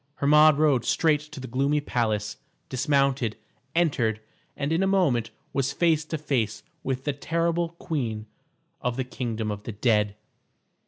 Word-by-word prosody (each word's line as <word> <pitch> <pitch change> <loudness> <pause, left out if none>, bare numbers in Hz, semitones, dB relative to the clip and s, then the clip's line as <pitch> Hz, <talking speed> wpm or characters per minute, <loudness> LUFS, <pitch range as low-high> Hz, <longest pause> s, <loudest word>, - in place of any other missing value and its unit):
Hermod 150 +1 +6
rode 145 -6 +3
straight 155 -3 +3
to 150 - -8
the 130 - -6
gloomy 140 +4 +1
palace, 110 -7 -1 0.3
dismounted, 135 -3 +1 0.4
entered, 130 -10 +2 0.4
and 145 +2 -1
in 165 - +2
a 195 - +2
moment 145 - +2 0.2
was 135 0 0
face 160 -1 +2
to 160 - -3
face 115 -8 -1 0.2
with 130 0 -3
the 145 - -1
terrible 170 +3 0
queen 115 -12 -3 0.6
of 125 -1 -1
the 130 - 0
kingdom 115 -4 -3
of 105 0 -5
the 110 - -6
dead. 105 -2 +2
135 Hz, 150 wpm, -26 LUFS, 115-155 Hz, 0.6 s, Hermod